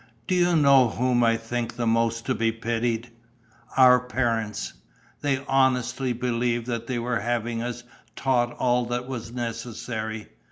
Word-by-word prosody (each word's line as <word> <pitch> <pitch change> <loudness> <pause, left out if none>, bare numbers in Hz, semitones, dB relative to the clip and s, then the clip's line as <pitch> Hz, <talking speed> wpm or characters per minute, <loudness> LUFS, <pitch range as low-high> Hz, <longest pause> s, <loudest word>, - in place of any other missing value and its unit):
Do - - -1
you 175 -1 +3
know 140 -5 +6
whom 125 +1 +1
I 115 0 +3
think 115 +1 -4
the 120 -1 -2
most 115 0 +1
to - - +1
be 115 +1 +1
pitied? 115 +1 -2 0.7
Our 125 -1 +7
parents! 115 -4 -2 0.5
They 140 -1 -1
honestly 130 -1 +1
believed 120 -1 -1
that 115 -1 -4
they 125 - -2
were 120 0 -1
having 120 -1 -2
us 120 0 -4 0.3
taught 120 -3 +1
all 125 -1 +1
that 120 +1 -3
was 120 -4 -6
necessary. 115 -2 -4
120 Hz, 150 wpm, -25 LUFS, 115-125 Hz, 0.7 s, Our